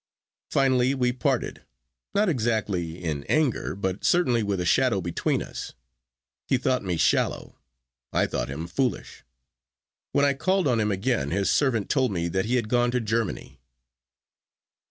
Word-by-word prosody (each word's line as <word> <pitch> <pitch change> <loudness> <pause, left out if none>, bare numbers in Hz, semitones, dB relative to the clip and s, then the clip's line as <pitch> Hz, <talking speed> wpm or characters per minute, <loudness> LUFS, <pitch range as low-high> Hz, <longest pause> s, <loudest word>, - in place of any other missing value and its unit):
Finally 130 -1 +2
we 125 -2 +1
parted, 125 - -1 0.5
not 210 +1 +3
exactly 110 - -1
in 75 -4 -2
anger, 150 -6 0
but 95 -1 -3
certainly 140 -10 +3
with 100 -3 -1
a 90 - -1
shadow 125 +1 +3
between 85 -2 -1
us. - - -7 0.7
He 130 - +3
thought 130 -1 0
me 90 -3 -1
shallow, - - 0 0.5
I - - +2
thought - - -3
him 75 +4 -5
foolish. 125 +9 -2 0.9
When 140 - +3
I 140 - +3
called 180 +4 +1
on 120 -3 +2
him 105 -1 +1
again 100 - 0
his 95 +3 +1
servant 120 -8 +1
told 130 -5 +1
me 85 -2 -1
that 95 +3 0
he 120 +3 0
had 120 -4 0
gone 120 +1 +2
to 125 +1 0
Germany. 110 - -3
115 Hz, 155 wpm, -26 LUFS, 95-130 Hz, 0.9 s, not